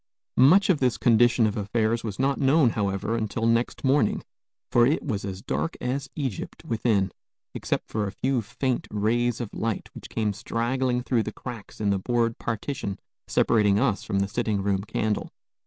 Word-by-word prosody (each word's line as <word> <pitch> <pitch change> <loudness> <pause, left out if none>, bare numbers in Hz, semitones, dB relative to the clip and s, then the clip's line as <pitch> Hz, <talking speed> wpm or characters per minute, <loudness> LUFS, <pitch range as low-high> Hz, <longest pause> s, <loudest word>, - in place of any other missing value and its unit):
Much 165 +11 +6
of 160 - +1
this 125 -3 +1
condition 120 0 +4
of 105 - 0
affairs 110 +2 0
was 105 -3 -4
not 135 +1 +1
known, 135 -2 +4
however, 100 +2 -1
until 110 0 -2
next 115 +1 +1
morning; 135 -5 +2 0.5
for 120 0 +5
it 150 - +1
was 110 -8 -2
as 95 -1 -6
dark 75 +5 -2
as 135 +2 -2
Egypt 130 - -4
within, 110 -4 +1 0.4
except - - -2
for 105 -2 -2
a - - -4
few 130 +2 0
faint 125 +4 -2
rays 115 +3 0
of 120 -4 -5
light 115 -3 -3
which - - -10
came 105 -2 -1
straggling 125 +4 -1
through 125 -3 +1
the 110 - -4
cracks 115 -2 -9
in 105 -2 +1
the 100 - +1
board 115 +2 0
partition 115 -2 -3 0.3
separating 105 -3 +3
us 115 -5 +1
from 100 - -2
the 100 - 0
sitting 105 -2 -1
room 100 -1 +1
candle. 105 0 -2
115 Hz, 175 wpm, -26 LUFS, 105-125 Hz, 0.5 s, Much